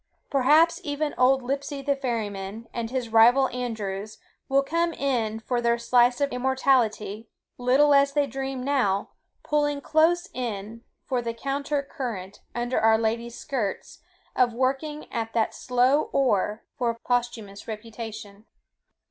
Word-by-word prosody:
Perhaps 300 +5 +4
even 295 +1 -2
old 260 +1 +3
Lipsey 275 +2 -3
the 280 0 +1
ferryman, 220 -4 -4
and 230 -1 -3
his 250 -2 -3
rival 240 +4 +6
Andrews, 215 -4 -4 0.3
will 275 +1 +3
come 335 +4 0
in 235 -7 -1
for 240 +2 -2
their 235 0 +2
slice 245 +1 +3
of 285 -1 +1
immortality, 245 -5 +1 0.3
little 265 +4 +4
as 280 0 +4
they 290 -1 +2
dream 270 0 -4
now, 245 -8 +1 0.3
pulling 290 -1 +1
close 325 +4 +2
in 225 -2 -5 0.2
for 250 -2 -1
the 230 -1 -4
counter 280 +3 -2
current 225 - -6
under 240 +1 0
our 220 0 +5
Lady's 230 +1 -2
skirts, 245 -9 -4 0.4
of 240 -2 +2
working 275 +4 -1
at 225 -1 -3
that 225 -1 +1
slow 255 +4 +2
oar 215 -5 +1 0.2
for 235 -2 0
posthumous 235 -4 -3
reputation. 215 -2 -8
245 Hz, 135 wpm, -26 LUFS, 225-275 Hz, 0.4 s, rival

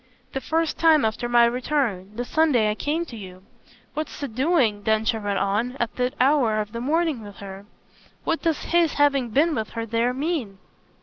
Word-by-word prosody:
"The 270 - -3
first 325 +1 -1
time 315 -5 +5
after 220 +2 -2
my 240 -1 +6
return 235 -6 -1
the 245 +2 -3
Sunday 255 -8 +2
I - - 0
came 300 +9 -2
to 250 - -10
you. 185 -3 -10 0.5
What's 310 +1 -5
he 285 - -3
doing," 255 -4 +1
Densher 220 +2 +1
went 205 -2 -2
on, 220 +6 -1
"at 235 -1 -2
that 250 0 -1
hour 255 -5 +3
of 210 -1 -4
the 235 - -5
morning 310 -1 0
with 205 -1 -10
her? 195 0 -10 0.6
What 330 - -1
does 325 -2 0
his 340 -2 +2
having 280 -4 +2
been 305 +8 +2
with 220 -7 -2
her 230 -1 -3
there 230 +2 0
mean?" 265 - -3
245 Hz, 190 wpm, -24 LUFS, 215-300 Hz, 0.6 s, my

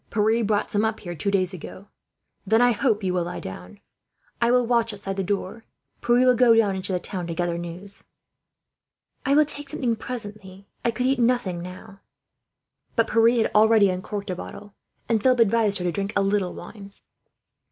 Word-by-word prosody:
Pierre 220 +2 +2
brought 205 -1 0
some 205 +1 +1
up 220 0 -1
here, 175 -2 -6
two 170 +4 -2
days 190 -2 +1
ago. 185 +3 -10 0.6
Then 220 +3 +3
I 245 0 +5
hope 220 -2 0
you 185 -1 0
will 180 -2 0
lie 175 - -5
down. 90 -1 -9 0.6
I 235 - +3
will 250 0 +3
watch 230 -1 +1
outside 200 -1 -5
the 195 - -2
door. 200 +3 -3 0.4
Pierre 240 +2 +3
will 250 - +6
go 240 -1 +5
down 210 -4 +3
into 190 +1 -4
the 180 - 0
town, 180 -1 -4
to 165 - -4
gather 175 0 -1
news." 175 +4 -5 1.2
"I 280 - +4
will 305 +1 +5
take 290 -1 -8
something 240 -4 -1
presently," 215 -2 -6
she - - -14
said. - - -28 0.2
"I - - +4
could 245 +2 -2
eat 265 0 +1
nothing, 235 -8 +1
now." 185 +2 -10 1.0
But 230 -1 +1
Pierre 225 +1 +5
had - - -2
already 215 -2 +5
uncorked 200 +2 -5
a - - -3
bottle, 205 +3 -9 0.3
and 225 -2 +1
Philip 255 0 +3
advised 220 -2 +3
her 180 - -5
to 175 - +1
drink 200 +3 -3
a 200 - +3
little 195 -2 0
wine. 200 -2 -11
205 Hz, 200 wpm, -24 LUFS, 185-230 Hz, 1.2 s, will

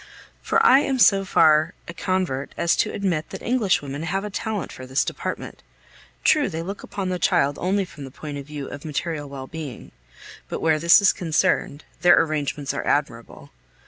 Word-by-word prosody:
For 455 0 +2
I 275 - +7
am 275 -2 0
so 195 -5 +5
far 155 -3 +3
a 170 - -7
convert 175 -7 -2
as 170 - +2
to - - +1
admit 180 -6 -2
that - - -8
English 230 -10 +1
women 140 +1 -5
have 195 +4 -2
a 210 - -5
talent 210 -2 -3
for 130 - -10
this 130 +1 +1
department. - - -5 0.6
True, 300 -6 +3
they 165 -2 -4
look 195 +3 -6
upon 195 -2 -4
the 180 -1 -2
child 140 -3 +2
only 195 +2 +1
from 150 -5 -11
the 135 - -8
point 145 +2 -7
of 140 - -10
view 150 -2 -6
of 145 - -8
material 155 -1 -4
well 135 -1 -7
being; 145 -4 -8 0.6
but - - -4
where 160 -1 +2
this 170 +5 +6
is 195 - +5
concerned, 155 -3 0 0.2
their 175 -1 +6
arrangements 150 -3 -1
are - - -3
admirable. - - -2
165 Hz, 190 wpm, -23 LUFS, 145-195 Hz, 0.6 s, I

